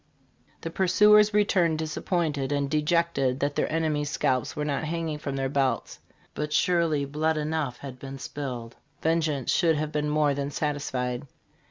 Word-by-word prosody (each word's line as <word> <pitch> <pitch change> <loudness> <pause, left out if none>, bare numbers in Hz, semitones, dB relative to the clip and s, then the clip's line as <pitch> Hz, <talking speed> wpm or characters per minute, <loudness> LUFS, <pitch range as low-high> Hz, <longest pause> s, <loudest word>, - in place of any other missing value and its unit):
The 165 - -5
pursuers 210 +4 +5
returned 185 -6 +2
disappointed 155 -3 -1
and 140 -1 0
dejected 150 -4 +1
that 145 0 -1
their - - 0
enemies' 155 -2 0
scalps 130 -4 0
were 150 - -2
not 145 +1 -1
hang 165 +1 -2
ing 150 -1 -4
from 140 -2 -4
their 135 -1 -1
belts. 135 -1 -1 0.3
But 150 0 -3
surely 160 -3 +2
blood 155 +3 0
enough 150 -4 -2
had 130 -2 -9
been 135 +1 -7
spilled 125 -3 -6 0.3
vengeance 155 -5 +1
should 165 -3 +3
have 150 0 -2
been 150 0 -1
more 150 -1 +2
than 140 0 -2
satisfied. 140 -3 -2
150 Hz, 160 wpm, -27 LUFS, 140-160 Hz, 0.3 s, pursuers